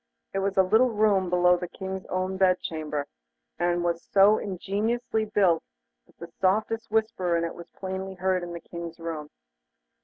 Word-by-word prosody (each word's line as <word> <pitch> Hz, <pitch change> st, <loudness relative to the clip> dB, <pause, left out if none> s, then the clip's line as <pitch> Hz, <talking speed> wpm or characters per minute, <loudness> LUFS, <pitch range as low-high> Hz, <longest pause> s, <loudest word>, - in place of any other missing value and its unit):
It 195 Hz, -, 0 dB
was 195 Hz, 0 st, -1 dB
a 190 Hz, -, +7 dB
little 220 Hz, +7 st, +4 dB
room 205 Hz, -4 st, +2 dB
below 180 Hz, 0 st, +4 dB
the 180 Hz, 0 st, -5 dB
King's 190 Hz, +1 st, -6 dB
own 185 Hz, +1 st, -2 dB
bed 185 Hz, -1 st, +3 dB
chamber, 150 Hz, -3 st, -3 dB, 0.5 s
and 175 Hz, 0 st, +1 dB
was 170 Hz, -1 st, 0 dB
so 200 Hz, +2 st, +5 dB
ingeniously 215 Hz, +4 st, -1 dB
built 195 Hz, -6 st, +3 dB, 0.5 s
that -, -, -27 dB
the 170 Hz, 0 st, -10 dB
softest 215 Hz, +4 st, +1 dB
whisper 210 Hz, -6 st, +1 dB
in 170 Hz, -, 0 dB
it 165 Hz, -, -3 dB
was 170 Hz, 0 st, -11 dB
plainly 190 Hz, 0 st, -5 dB
heard 185 Hz, 0 st, 0 dB
in 175 Hz, 0 st, -6 dB
the 170 Hz, -, -7 dB
King's 170 Hz, -1 st, -8 dB
room. 165 Hz, -3 st, -5 dB
185 Hz, 175 wpm, -27 LUFS, 175-200 Hz, 0.5 s, a